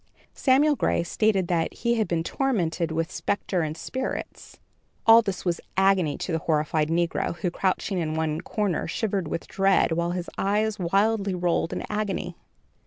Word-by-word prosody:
Samuel 290 Hz, +3 st, +3 dB
Gray 170 Hz, -, +1 dB
stated 195 Hz, 0 st, +1 dB
that 165 Hz, -2 st, +1 dB
he 235 Hz, 0 st, 0 dB
had 220 Hz, -3 st, 0 dB
been 165 Hz, -1 st, 0 dB
tormented 175 Hz, -, -1 dB
with 165 Hz, +1 st, -2 dB
spectres 190 Hz, -3 st, -1 dB
and 155 Hz, +2 st, -6 dB
spirits. 260 Hz, +8 st, -5 dB, 0.5 s
All 225 Hz, 0 st, +8 dB
this 195 Hz, -5 st, -4 dB
was 175 Hz, -2 st, 0 dB, 0.2 s
agony 190 Hz, -6 st, +3 dB
to -, -, -4 dB
the 165 Hz, -, 0 dB
horrified 155 Hz, 0 st, 0 dB
negro, 170 Hz, 0 st, 0 dB
who, 175 Hz, +1 st, -2 dB
crouching 190 Hz, +1 st, -1 dB
in 155 Hz, -2 st, -2 dB
one 160 Hz, -1 st, -1 dB
corner, 205 Hz, -6 st, -1 dB
shivered 195 Hz, -1 st, -1 dB
with 165 Hz, -, -4 dB
dread, 195 Hz, -2 st, +2 dB
while 170 Hz, +1 st, 0 dB
his 180 Hz, 0 st, -3 dB
eyes 210 Hz, +2 st, 0 dB
wildly 200 Hz, +2 st, +1 dB
rolled 175 Hz, -1 st, 0 dB
in -, -, -3 dB
agony. 200 Hz, -4 st, -3 dB
180 Hz, 165 wpm, -25 LUFS, 165-210 Hz, 0.5 s, All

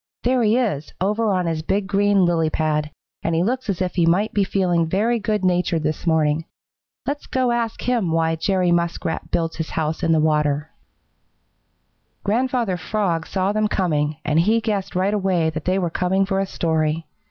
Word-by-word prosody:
There 250 Hz, +1 st, +2 dB
he 220 Hz, +1 st, +3 dB
is, 195 Hz, -, -1 dB
over 210 Hz, +4 st, +1 dB
on 185 Hz, -2 st, 0 dB
his 165 Hz, -2 st, -1 dB
big 195 Hz, +5 st, -1 dB
green 200 Hz, -1 st, +3 dB
lily 165 Hz, -2 st, +2 dB
pad, 150 Hz, -1 st, 0 dB, 0.3 s
and 165 Hz, -, -1 dB
he 165 Hz, -, +2 dB
looks 250 Hz, +3 st, -2 dB
as 190 Hz, -1 st, 0 dB
if 180 Hz, -, -3 dB
he 170 Hz, -3 st, +2 dB
might 195 Hz, +6 st, +2 dB
be 205 Hz, -, +2 dB
feeling 180 Hz, -4 st, +1 dB
very 225 Hz, +6 st, +1 dB
good 210 Hz, -2 st, -1 dB
natured 175 Hz, -3 st, +1 dB
this 155 Hz, +3 st, -2 dB
morning. 160 Hz, -1 st, +2 dB, 0.6 s
Let's 290 Hz, +1 st, -4 dB
go 255 Hz, -2 st, +1 dB
ask 235 Hz, -1 st, -2 dB
him 235 Hz, -9 st, 0 dB
why 165 Hz, 0 st, +1 dB
Jerry 185 Hz, +1 st, +1 dB
Muskrat 170 Hz, -1 st, -1 dB
builds 165 Hz, -1 st, -1 dB
his 160 Hz, -1 st, -3 dB
house 160 Hz, 0 st, -2 dB
in 165 Hz, -, +1 dB
the 160 Hz, -, +4 dB
water." 150 Hz, -1 st, +1 dB, 1.5 s
Grandfather 235 Hz, -2 st, 0 dB
Frog 175 Hz, -5 st, -1 dB
saw 190 Hz, 0 st, 0 dB
them 215 Hz, 0 st, +1 dB
coming, 155 Hz, -7 st, 0 dB
and 150 Hz, +2 st, +2 dB
he 215 Hz, +7 st, +3 dB
guessed 210 Hz, -5 st, -2 dB
right 190 Hz, +3 st, +1 dB
away 185 Hz, -5 st, +1 dB
that 155 Hz, 0 st, -6 dB
they 185 Hz, +1 st, +1 dB
were 175 Hz, -3 st, -1 dB
coming 190 Hz, +3 st, +1 dB
for 195 Hz, 0 st, -1 dB
a 195 Hz, -, -1 dB
story. 160 Hz, -2 st, -1 dB
180 Hz, 185 wpm, -22 LUFS, 160-205 Hz, 1.5 s, the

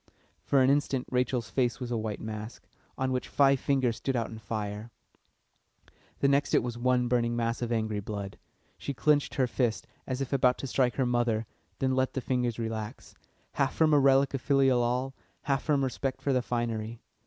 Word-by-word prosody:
For 135 Hz, -2 st, +3 dB
an 130 Hz, -, +5 dB
instant 140 Hz, -2 st, +1 dB
Rachel's 125 Hz, -2 st, 0 dB
face 125 Hz, 0 st, 0 dB
was 125 Hz, -2 st, -5 dB
a -, -, 0 dB
white 110 Hz, -2 st, -3 dB
mask, 110 Hz, +1 st, -7 dB, 0.3 s
on 130 Hz, -1 st, 0 dB
which 130 Hz, -1 st, -2 dB
five 140 Hz, -1 st, +4 dB
fingers 130 Hz, -5 st, +1 dB
stood 135 Hz, +3 st, -2 dB
out 115 Hz, -2 st, -1 dB
in 110 Hz, -, -8 dB
fire; 105 Hz, +1 st, -4 dB, 1.3 s
the 140 Hz, -, +4 dB
next 140 Hz, +1 st, +2 dB
it -, -, +4 dB
was 120 Hz, -1 st, -3 dB
one 125 Hz, 0 st, +1 dB
burning 120 Hz, -1 st, +1 dB
mass 115 Hz, 0 st, -1 dB
of 120 Hz, -1 st, -2 dB
angry 110 Hz, -2 st, 0 dB
blood. 100 Hz, -1 st, -6 dB, 0.4 s
She 140 Hz, -, -4 dB
clenched 145 Hz, +5 st, +2 dB
her 130 Hz, -, +3 dB
fist, 120 Hz, -2 st, -1 dB, 0.2 s
as 130 Hz, -1 st, -2 dB
if 135 Hz, 0 st, -3 dB
about 130 Hz, -2 st, +3 dB
to -, -, -5 dB
strike 125 Hz, -1 st, +1 dB
her 135 Hz, -, +1 dB
mother, 120 Hz, -2 st, +1 dB, 0.3 s
then 130 Hz, -1 st, +1 dB
let 130 Hz, 0 st, +1 dB
the -, -, -1 dB
fingers 125 Hz, -2 st, -1 dB
relax; 110 Hz, -2 st, -5 dB, 0.4 s
half -, -, 0 dB
from 155 Hz, -1 st, +4 dB
a 145 Hz, -, +6 dB
relic 135 Hz, 0 st, +4 dB
of 135 Hz, -, -2 dB
filial 135 Hz, -3 st, +3 dB
awe, 125 Hz, +3 st, 0 dB, 0.3 s
half 135 Hz, -2 st, 0 dB
from 145 Hz, -2 st, +1 dB
respect 135 Hz, +1 st, -3 dB
for 140 Hz, -, +1 dB
the 130 Hz, -, +2 dB
finery. 115 Hz, -2 st, -3 dB
125 Hz, 195 wpm, -29 LUFS, 115-135 Hz, 1.3 s, a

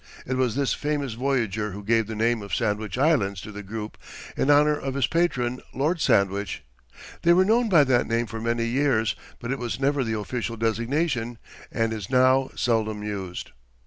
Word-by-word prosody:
It 130 Hz, -, -2 dB
was 130 Hz, -3 st, +1 dB
this 140 Hz, -1 st, +1 dB
famous 145 Hz, -4 st, -2 dB
voyager 115 Hz, -5 st, -1 dB
who 100 Hz, +1 st, -8 dB
gave 115 Hz, 0 st, +2 dB
the 110 Hz, -, -5 dB
name 115 Hz, +1 st, +1 dB
of 100 Hz, -3 st, -3 dB
Sandwich 105 Hz, 0 st, -1 dB
Islands 125 Hz, -, +2 dB
to 105 Hz, -, -8 dB
the 105 Hz, 0 st, -7 dB
group, 105 Hz, +2 st, -7 dB, 0.4 s
in 135 Hz, -, 0 dB
honour 150 Hz, +1 st, +5 dB
of 135 Hz, -2 st, -4 dB
his 140 Hz, -3 st, +2 dB
patron, 130 Hz, -8 st, 0 dB
Lord 155 Hz, +5 st, 0 dB
Sandwich. 100 Hz, -6 st, +1 dB, 0.6 s
They 170 Hz, -, +5 dB
were 185 Hz, +2 st, +5 dB
known 230 Hz, +3 st, +3 dB
by 165 Hz, -7 st, +6 dB
that 130 Hz, -3 st, +2 dB
name 115 Hz, +1 st, 0 dB
for 110 Hz, 0 st, -7 dB
many 115 Hz, 0 st, 0 dB
years, 120 Hz, -2 st, +1 dB, 0.2 s
but 120 Hz, 0 st, -4 dB
it 135 Hz, -, -2 dB
was 120 Hz, -2 st, -3 dB
never 140 Hz, 0 st, +1 dB
the 110 Hz, -2 st, -2 dB
official 115 Hz, +2 st, -4 dB
designation, 115 Hz, +2 st, -1 dB, 0.3 s
and 115 Hz, -1 st, 0 dB
is 105 Hz, -4 st, -6 dB
now 130 Hz, +1 st, +4 dB
seldom 110 Hz, -3 st, 0 dB
used. 95 Hz, -4 st, -5 dB
120 Hz, 185 wpm, -25 LUFS, 110-135 Hz, 0.6 s, by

